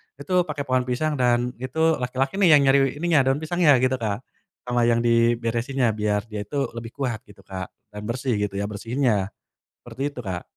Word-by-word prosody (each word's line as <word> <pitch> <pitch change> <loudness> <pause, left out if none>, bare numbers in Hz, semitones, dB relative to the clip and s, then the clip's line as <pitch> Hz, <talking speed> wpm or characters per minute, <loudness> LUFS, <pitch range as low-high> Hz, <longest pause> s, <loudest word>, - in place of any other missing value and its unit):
itu 180 +6 0
pake 145 -1 -3
pohon 130 -2 0
pisang 145 +3 -1
dan 120 0 +2
itu 160 +5 +1
laki-laki 130 +8 -2
nih 175 -6 +7
yang 145 - +5
nyari 140 - +5 0.2
ininya 170 -4 +4
daun 135 +2 +2
pisangnya 165 -2 +4
gitu 130 0 +1
Kak, 110 +2 -3 0.4
sama 120 -1 +1
yang 115 0 +2
diberesinnya 115 +2 +1
biar 105 -1 -1
dia 105 -1 -5
itu 140 +2 -2
lebih 115 0 -8
kuat 125 -6 -2
gitu 105 - -17
Kak 95 -2 -6 0.3
dan 105 - -7
bersih 125 +1 -1
gitu 100 -1 -2
ya 100 - -1
bersihinnya, 105 -1 -1 0.5
seperti 120 +2 -8
itu 140 - -13
Kak. 95 -7 -4
125 Hz, 185 wpm, -24 LUFS, 110-140 Hz, 0.5 s, nih